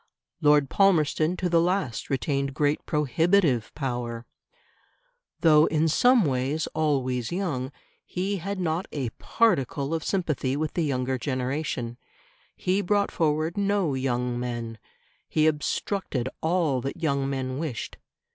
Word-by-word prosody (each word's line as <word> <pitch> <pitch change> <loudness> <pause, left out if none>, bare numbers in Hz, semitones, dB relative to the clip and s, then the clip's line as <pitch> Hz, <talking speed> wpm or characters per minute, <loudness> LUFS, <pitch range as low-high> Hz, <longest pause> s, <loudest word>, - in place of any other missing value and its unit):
Lord 150 -1 +5
Palmerston 170 -2 +2
to 180 - -1
the 170 -1 +3
last 175 - -1
retained 140 0 -1
great 145 0 +1
prohibitive 150 - +2
power. 120 -4 -3 1.2
Though 155 -2 +6
in 160 0 +2
some 245 - +4
ways 135 +3 0
always 130 -6 0
young, 155 -8 -2 0.3
he 195 +2 -2
had 195 +2 -4
not 170 0 -1
a 135 -5 -2
particle 150 - +1
of 160 -1 -1
sympathy 155 -8 -1
with 155 0 -2
the 175 - 0
younger 130 -3 -1
generation; 130 -1 -3 0.6
he 185 +2 0
brought 205 +1 +1
forward 155 +1 0
no 200 -6 +1
young 125 -2 -1
men; 120 -2 -4 0.5
he 155 - +2
obstructed 150 - -1
all 160 -6 +1
that 135 +6 -4
young 140 -4 0
men 130 -1 -3
wished. 150 -9 -4
150 Hz, 130 wpm, -26 LUFS, 130-170 Hz, 1.2 s, Though